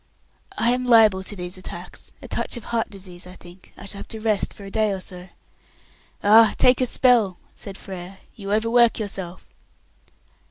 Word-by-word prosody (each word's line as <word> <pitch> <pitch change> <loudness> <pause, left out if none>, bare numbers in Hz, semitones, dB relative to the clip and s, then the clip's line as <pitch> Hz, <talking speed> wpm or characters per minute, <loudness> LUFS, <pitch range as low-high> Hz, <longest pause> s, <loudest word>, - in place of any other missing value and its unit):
"I 235 +2 +3
am 250 +1 0
liable 220 -5 +6
to 200 +2 -7
these 180 0 -5
attacks. - - -9
A - - -8
touch - - -2
of 235 - -8
heart 230 0 -1
disease, 185 -3 -7
I 180 - -10
think. 175 +1 -15
I 195 - -9
shall 200 0 -3
have - - -8
to 220 - -5
rest 215 -2 0
for 205 - -12
a 195 - -9
day 215 -1 +1
or 195 - -3
so." 180 0 -8 0.9
"Ah, 220 +2 +7
take 250 0 +4
a 255 - +2
spell," 230 -8 +3 0.2
said 195 -1 -8
Frere; 190 0 -8 0.2
"you 200 -2 -7
overwork 230 +2 +3
yourself." 190 -4 -5
200 Hz, 185 wpm, -23 LUFS, 185-225 Hz, 0.9 s, Ah